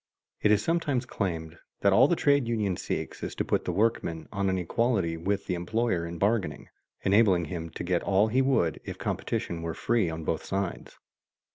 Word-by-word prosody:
It 105 - +4
is 105 0 +3
sometimes 150 -7 0
claimed 85 -8 -3 0.2
that 100 -1 +4
all 125 +7 +7
the 175 - +2
trade 140 -5 +3
union 105 -5 0
seeks - - -4
is - - -4
to - - -1
put - - 0
the - - 0
workman 100 -7 0
on 100 -1 0
an 95 - +1
equality 95 -1 0
with 100 +4 -2
the 90 - -2
employer 90 0 -1
in 85 0 -6
bargaining, 100 +1 0 0.3
enabling 95 -4 +4
him 85 +1 -5
to - - -6
get 90 -1 +1
all 100 +2 +3
he 125 +4 +2
would 130 - +1
if - - -6
competition 85 -1 -3
were 80 -1 -4
free 115 -7 +1
on 80 0 -5
both 80 - -1
sides. 95 -2 -4
100 Hz, 190 wpm, -28 LUFS, 85-115 Hz, 0.3 s, all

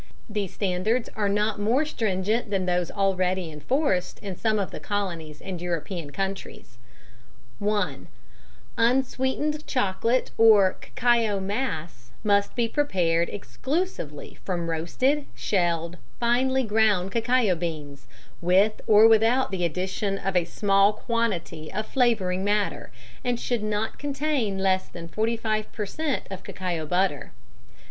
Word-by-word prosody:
These 210 -4 -3
standards 205 +5 0
are 205 -2 0
not 210 +1 0
more 240 +9 +2
stringent 215 -3 -1
than 195 -2 0
those 180 -1 0
already 185 -3 0
enforced 180 - 0
in 195 -3 -6
some 215 +3 +1
of 200 -2 -2
the - - -6
Colonies 170 -7 -3
and 185 -3 -5
European 170 -2 -3
countries: 195 -9 -5 0.8
(1) 205 -9 -1 0.7
Unsweetened 265 +5 +1
chocolate 235 +1 0
or 210 -4 +7
cacao 235 -4 +1
mass 175 - -4
must 200 -1 +2
be 240 -2 +1
prepared 175 - +1
exclusively 265 - -4
from 170 -3 -2
roasted, 255 - 0
shelled, 170 -3 0 0.2
finely 260 +3 +2
ground 210 -4 +2
cacao 230 -2 +2
beans, 150 -6 -5 0.3
with 190 +5 +3
or 215 +1 +8
without 225 +3 +4
the 185 -2 -2
addition 185 +4 -1
of 195 -1 -3
a 175 -2 +3
small 200 +1 +3
quantity 200 -9 -2
of 215 - -2
flavouring 215 -8 +1
matter, 205 0 0 0.3
and 245 -1 0
should 240 -2 -1
not 215 +1 -2
contain 280 -7 -1
less 190 -1 +1
than 170 -1 -9
45 215 +2 -1
per 210 - -3
cent. 295 +6 -2
of 190 - -6
cacao 175 -4 -4
butter. 180 -6 0
200 Hz, 125 wpm, -26 LUFS, 180-230 Hz, 0.8 s, or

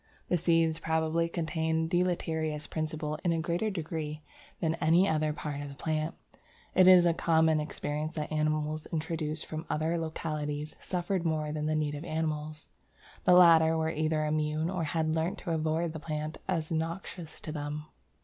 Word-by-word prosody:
The 180 - +3
seeds 165 -1 +2
probably 160 +1 +1
contain 160 -1 0
the 175 +1 +2
deleterious 160 -4 -1
principle 155 -1 -3
in 175 - +2
a 165 - +1
greater 170 +6 0
degree 155 -4 -4 0.4
than 160 -2 +1
any 170 +5 +5
other 155 -3 +1
part 150 -1 -4
of 145 - -6
the 140 - -9
plant. 155 +2 -2 0.6
It 185 0 +6
was 180 -1 +8
a 170 - +4
common 160 -1 +3
experience 150 0 -3
that 150 -1 -3
animals 155 0 0
introduced 155 -1 -3
from 155 0 -5
other 160 +2 0
localities 155 -2 -3
suffered 180 0 -1
more 155 -2 0
than 150 0 -2
the 155 - +1
native 150 -1 -1
animals. 155 -2 -3 0.6
The 180 - +6
latter 165 -2 +7
were 160 0 0
either 155 0 0
immune 155 +2 0
or 180 -4 -1
had 155 +1 0
learnt 165 +3 0
to 175 - -3
avoid 160 +1 0
the 160 - -5
plant 155 0 -4
as 165 -4 -1
noxious 165 +1 -4
to 155 - -6
them." 150 0 -4
160 Hz, 170 wpm, -30 LUFS, 155-165 Hz, 0.6 s, was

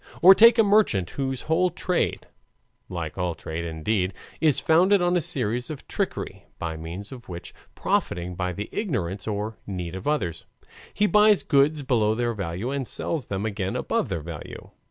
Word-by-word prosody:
Or 190 +2 +11
take 230 +4 +7
a 225 - +6
merchant 200 - +3
whose 135 -2 -3
whole 175 +3 +2
trade 180 +1 -1 0.6
like 85 -1 -5
all 90 -2 -1
trade 80 +1 -5
indeed 90 +4 -1 0.2
is 155 -4 +3
founded 185 +5 +4
on 175 0 +2
a 175 - +3
series 120 -3 -1
of 155 -3 -8
trickery, - - -3
by 80 -1 -4
means 85 +7 -7
of 125 -5 -11
which, 85 -1 -7 0.2
profiting 90 +1 -1
by 90 0 -2
the 105 +5 -5
ignorance 110 - -2
or 105 +1 -3
need 90 -4 -4
of 95 +8 -6
others, 90 - -1 0.4
he 210 - +1
buys 210 -1 +5
goods 145 +1 +3
below 110 -5 +2
their 120 0 0
value 100 +4 -3
and 140 -3 -2
sells 155 -6 -3
them 100 +1 -3
again 100 -3 -2
above - - -1
their 85 - -2
value. 80 -1 -9
110 Hz, 175 wpm, -25 LUFS, -, 0.6 s, Or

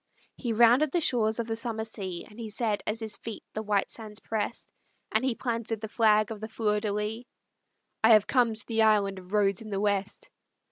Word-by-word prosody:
He 240 - -3
rounded 240 +6 +5
the 350 - +2
shores 225 -8 +2
of 235 - -1
the 225 0 -2
summer 225 -1 -3
sea, 190 -5 -5
And 210 - -15
he 225 -2 -5
said 215 -1 -1
as 215 +2 -1
his 220 -2 -5
feet 225 -2 -7
the 215 - -3
white 205 -2 0
sands 215 -2 -7
pressed, 220 +1 -4 0.4
And 220 +3 +1
he 260 -3 +1
planted 230 -3 -2
the 220 - -5
flag 215 -1 +3
of 215 - -5
the 220 - -4
Fleur 215 -2 0
de 210 0 -2
lis: 210 +3 -3 0.8
"I 225 +1 +8
have 215 -1 +6
come 240 -3 +2
to 215 - -7
the 225 -1 0
Island 205 -3 +3
of 180 0 -15
Rhodes 200 -2 +2
in 220 - -9
the 195 -1 -2
West. 205 - -1
220 Hz, 220 wpm, -28 LUFS, 210-230 Hz, 0.8 s, I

